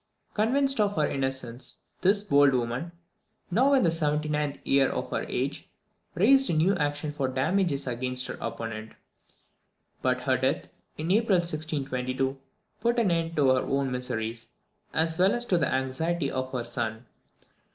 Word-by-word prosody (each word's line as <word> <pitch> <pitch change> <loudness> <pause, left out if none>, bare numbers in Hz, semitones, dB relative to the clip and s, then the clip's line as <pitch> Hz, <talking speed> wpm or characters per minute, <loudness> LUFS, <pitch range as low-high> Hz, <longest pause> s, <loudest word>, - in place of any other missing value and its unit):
Convinced 270 +5 +2
of 205 -1 +1
her 150 -2 +2
innocence, 130 -2 -3 0.2
this 200 +2 +3
bold 145 -7 +4
woman, 125 +7 -2 0.6
now 260 +9 +4
in 265 -3 +4
the - - +4
79th 150 -2 0
year 135 -1 +3
of - - -4
her - - -1
age, - - -3 0.5
raised 270 +9 +5
a - - +1
new 165 +5 +3
action 145 +1 -1
for 140 -2 -1
damages 145 +4 0
against 125 0 -1
her - - -5
opponent; 110 -1 -5 1.1
but 130 0 +1
her 130 0 +2
death, 130 +4 -1 0.3
in 160 +3 -2
April 210 -2 +4
1622, 135 -6 -2 0.4
put 235 +2 +1
an 220 -6 +3
end 165 -1 -1
to 140 -3 +4
her 130 0 +4
own 135 -1 -1
miseries, 115 -2 -4 0.4
as 160 +1 0
well 190 +2 +5
as 240 0 +1
to 180 -6 +2
the 145 - +1
anxiety 135 +4 -1
of 130 0 -3
her 125 -2 -2
son. 120 -1 -3
145 Hz, 155 wpm, -27 LUFS, 130-175 Hz, 1.1 s, raised